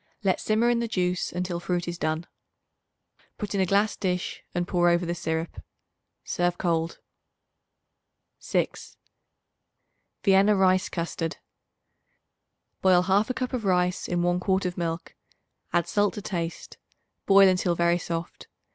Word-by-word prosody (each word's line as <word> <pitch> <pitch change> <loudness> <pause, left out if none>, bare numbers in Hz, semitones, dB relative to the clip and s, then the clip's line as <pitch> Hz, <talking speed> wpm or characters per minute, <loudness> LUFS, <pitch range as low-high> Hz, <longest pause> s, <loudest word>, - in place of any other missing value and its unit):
Let 190 -2 +2
simmer 220 +2 +2
in 235 - +1
the 235 - -1
juice 180 -4 -1
until 180 -1 -3
fruit 175 0 -2
is 175 0 -4
done. 155 +2 -1 1.1
Put 210 -1 -4
in 195 - +1
a 190 - +1
glass 205 +3 +2
dish 180 -3 -3
and 175 0 -1
pour 175 -1 +3
over 175 +1 +2
the 170 - -1
syrup. 160 -1 -3 0.6
Serve 175 0 -1
cold. 165 -2 -1 1.4
6. - - -3 1.3
Vienna 200 +1 +5
Rice 185 -1 +3
Custard. 170 -1 -3 1.4
Boil 185 -2 +5
1/2 200 +6 +2
cup 255 0 -3
of 245 -3 -2
rice 180 -2 +1
in 175 -1 0
1 175 0 +1
quart 190 0 0
of 180 -1 -2
milk; 170 0 -4 0.6
add 175 - +1
salt 205 -1 +1
to 210 - -5
taste; 170 -4 -5 0.5
boil 195 0 +7
until 180 -1 +2
very 170 +1 +2
soft. 165 0 -5
180 Hz, 140 wpm, -26 LUFS, 170-195 Hz, 1.4 s, boil